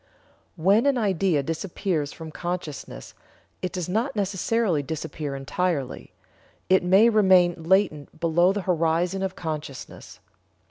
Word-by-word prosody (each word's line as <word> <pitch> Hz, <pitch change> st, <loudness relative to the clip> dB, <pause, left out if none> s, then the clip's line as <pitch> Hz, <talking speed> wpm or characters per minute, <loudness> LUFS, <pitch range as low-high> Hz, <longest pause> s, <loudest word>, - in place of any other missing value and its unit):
When 195 Hz, -, +3 dB
an 275 Hz, -2 st, +3 dB
idea 190 Hz, -, +1 dB
disappears 165 Hz, -1 st, -2 dB
from 160 Hz, -1 st, -9 dB
consciousness 175 Hz, -3 st, -6 dB, 0.5 s
it 185 Hz, -, -2 dB
does 180 Hz, -3 st, -4 dB
not 230 Hz, +9 st, -1 dB
necessarily 200 Hz, -3 st, 0 dB
disappear 150 Hz, -1 st, -5 dB
entirely; 140 Hz, +1 st, -3 dB, 0.6 s
it 190 Hz, 0 st, +5 dB
may 190 Hz, +5 st, +5 dB
remain 185 Hz, -6 st, +4 dB
latent 160 Hz, -4 st, +1 dB
below 170 Hz, +2 st, +3 dB
the 205 Hz, +1 st, -2 dB
horizon 175 Hz, +1 st, 0 dB
of 190 Hz, -1 st, -2 dB
consciousness. 155 Hz, -6 st, -7 dB
180 Hz, 120 wpm, -25 LUFS, 160-195 Hz, 0.6 s, it